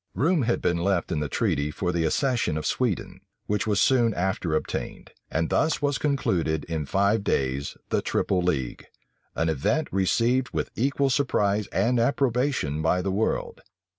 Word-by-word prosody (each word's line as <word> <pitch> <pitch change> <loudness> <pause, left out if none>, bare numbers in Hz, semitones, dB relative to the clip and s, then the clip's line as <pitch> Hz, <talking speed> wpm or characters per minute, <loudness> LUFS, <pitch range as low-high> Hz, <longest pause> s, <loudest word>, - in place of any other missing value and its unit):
Room 155 - +2
had 120 -1 0
been 85 -1 +1
left 95 -1 0
in 80 - 0
the 75 -1 -2
treaty 70 +2 0
for 90 +4 -2
the 85 -2 0
accession 120 - +1
of 75 - -4
Sweden, 120 -8 -1 0.2
which 105 +1 -1
was 105 -2 +2
soon 120 -1 +3
after 90 -3 -1
obtained; - - -4 0.2
and 80 +1 0
thus 160 0 +2
was 145 -1 0
concluded 90 - 0
in 80 -3 -4
five 100 +4 +2
days 70 -4 -1
the - - +1
triple 95 -2 0
league; 70 -9 -2 0.5
an 80 - 0
event 80 - 0
received 115 +7 +1
with - - -2
equal 140 +2 +1
surprise 105 -7 +1
and 115 +6 +1
approbation 125 - +1
by 90 +3 +1
the 95 - -1
world. 105 +4 -1
100 Hz, 165 wpm, -25 LUFS, 80-125 Hz, 0.5 s, soon